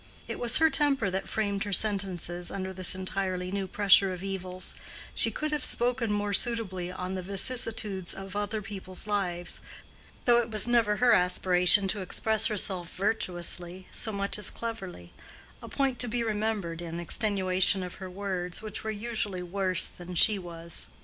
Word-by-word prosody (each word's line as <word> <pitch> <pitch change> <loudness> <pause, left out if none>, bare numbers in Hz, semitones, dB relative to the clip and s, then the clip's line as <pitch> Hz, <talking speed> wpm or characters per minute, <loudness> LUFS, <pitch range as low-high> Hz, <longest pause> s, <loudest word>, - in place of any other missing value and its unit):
It - - -5
was 240 -2 +3
her 320 0 +4
temper 275 -9 +2
that 190 +1 -3
framed 200 -2 -1
her 205 - -5
sentences 185 -4 0
under 190 -1 -4
this 185 -1 +2
entirely 185 -1 0
new 195 -1 -2
pressure 195 0 +5
of 180 0 -7
evils: 185 -1 -3 0.4
she - - +2
could 305 0 -3
have 300 -3 -1
spoken 240 -3 +2
more 205 0 -1
suitably 190 -5 -1
on 185 0 -5
the 190 - -3
vicissitudes 200 -1 -2
in 195 0 -8
other 205 +1 -2
people's 190 -2 -3
lives, 180 -4 -2 0.7
though 240 -1 +6
it 230 - -5
was 215 0 +3
never 230 -3 +3
her 245 +2 +4
aspiration 180 +1 +4
to 205 0 -2
express 220 +3 +1
herself 190 -5 0
virtuously 180 -2 -1
so 220 - 0
much 200 0 -2
as 210 - +1
cleverly—a 190 - -9
point 270 -3 0
to 245 - +1
be 235 +1 -1
remembered 210 -6 -2
in 170 0 -5
extenuation 190 0 +1
of 180 +2 -8
her 185 - -5
words, 185 0 -4
which 215 -1 -6
were 220 - -3
usually 210 -4 -3
worse 185 0 0
than 180 0 -8
she 205 +3 +6
was. 170 -2 -3
195 Hz, 165 wpm, -28 LUFS, 180-220 Hz, 0.7 s, though